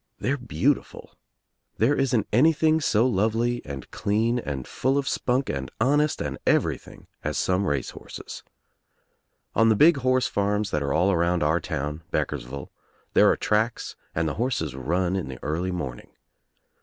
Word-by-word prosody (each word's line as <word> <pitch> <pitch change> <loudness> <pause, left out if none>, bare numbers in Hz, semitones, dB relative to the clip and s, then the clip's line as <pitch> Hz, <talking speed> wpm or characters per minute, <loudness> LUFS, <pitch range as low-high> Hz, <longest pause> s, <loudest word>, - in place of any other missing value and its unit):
They're 140 - 0
beautiful. 135 +1 -1 0.7
There 115 +6 +3
isn't 125 -6 +1
anything 160 +5 +4
so 115 -4 +3
lovely 115 +2 +1
and 70 -3 -8
clean 115 +4 0
and 70 - -5
full 135 +2 0
of 140 -1 -1
spunk 130 +2 0
and 65 -3 -3
honest 145 +6 +2
and - - -4
everything - - 0 0.2
as - - -2
some 95 +2 +1
race 70 -3 -1
horses. - - -9 1.1
On 115 0 +4
the 110 - +4
big 155 +7 +6
horse 130 -1 +2
farms 100 0 0
that 75 - 0
are 70 -1 -1
all 90 +7 +3
around 85 -1 +1
our 80 +3 +2
town 75 0 -4
Beck - - 0
ersville 70 0 -7 0.4
there - - +6
are - - +2
tracks 110 +2 0 0.2
and 80 0 +1
the 75 - -1
horses 110 - -1
run 85 +8 -1
in 95 - -2
the 65 -1 -7
early 85 +5 -1
morning. 70 -9 -5
100 Hz, 160 wpm, -25 LUFS, 75-125 Hz, 1.1 s, big